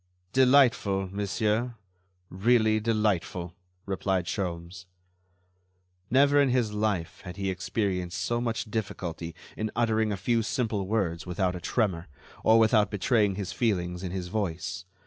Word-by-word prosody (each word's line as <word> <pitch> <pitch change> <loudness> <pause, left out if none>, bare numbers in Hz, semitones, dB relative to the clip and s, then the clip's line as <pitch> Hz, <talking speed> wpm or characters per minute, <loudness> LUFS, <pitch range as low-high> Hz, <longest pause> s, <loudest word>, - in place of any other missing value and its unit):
"Delightful, 125 -8 +4
monsieur, 105 +4 0 0.6
really 110 +2 +3
delightful," 105 -6 0 0.3
replied 95 -2 -1
Sholmes. 90 -1 -4 1.2
Never 140 +3 +5
in 140 - +3
his 120 -4 +1
life 105 -6 -1
had 90 -2 -8
he 95 -1 -1
experienced 90 -1 -2
so 120 0 -1
much 115 -2 -2
difficulty 85 -6 -4 0.2
in 110 0 -2
uttering 110 -2 +1
a 100 - -2
few 115 +5 +1
simple 110 -4 -1
words 95 -5 -1
without 90 +1 0
a 90 - -6
tremor, 95 -8 0 0.4
or 110 +1 +6
without 110 -1 +4
betraying 105 -1 +2
his 95 -2 -4
feelings 90 -6 -1
in 95 - -4
his 90 -1 -4
voice. 90 -3 -3
105 Hz, 130 wpm, -28 LUFS, 90-115 Hz, 1.2 s, or